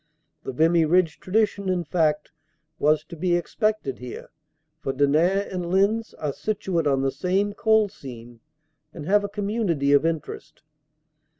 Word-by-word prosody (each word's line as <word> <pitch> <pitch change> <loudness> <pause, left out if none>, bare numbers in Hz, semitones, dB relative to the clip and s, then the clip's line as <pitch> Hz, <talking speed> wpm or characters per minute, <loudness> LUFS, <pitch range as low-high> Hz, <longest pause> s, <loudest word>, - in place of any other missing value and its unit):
The - - -4
Vimy 165 +5 +3
Ridge 170 0 +2
tradition, 200 0 0
in 180 -1 0
fact, 155 -2 0 0.5
was 155 +1 +3
to 165 - -11
be 175 +2 +1
expected 210 - -1
here, 125 -1 -8 0.5
for 135 -3 -3
Denain 160 +9 +2
and 180 -2 -3
Lens 200 +5 +1
are 150 -2 -3
situate 190 -5 -2
on 135 -1 +2
the 135 - +1
same 195 +5 0
coal 220 0 +3
seam 120 - -11 0.6
and 155 -4 -7
have 205 +4 +3
a 205 - -3
community 200 -9 -1
of 145 - +5
interest. 165 -2 -4
175 Hz, 145 wpm, -24 LUFS, 150-200 Hz, 0.6 s, of